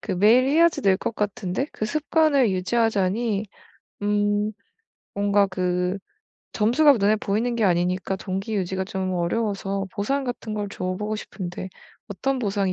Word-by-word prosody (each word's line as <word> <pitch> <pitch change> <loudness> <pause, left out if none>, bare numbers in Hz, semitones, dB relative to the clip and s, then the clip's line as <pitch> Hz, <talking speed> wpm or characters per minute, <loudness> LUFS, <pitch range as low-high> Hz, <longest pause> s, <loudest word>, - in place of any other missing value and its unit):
그 195 - -4
매일 220 +8 +5
해야지 330 +4 +4
늘 190 -2 +3
것 225 - -4
같은데 210 +3 -2
그 215 - -3
습관을 300 -2 +2
유지하자니 210 +1 0 0.6
음 205 +1 +1 0.6
뭔가 200 0 +3
그 180 0 -1 0.6
점수가 260 +7 +4
눈에 210 0 +3
보이는 220 +4 -1
게 230 -2 +1
아니니까 180 +1 +1
동기 195 +3 -4
유지가 190 0 -1
좀 190 -1 -3
어려워서 195 +2 -1
보상 270 +7 -1
같은 240 -3 -4
걸 205 -1 -3
줘 185 - -6
보고 210 +2 -3
싶은데 185 -3 -6 0.4
어떤 265 +6 -1
보상이 200 -4 0
205 Hz, 295 characters per minute, -24 LUFS, 190-230 Hz, 0.6 s, 매일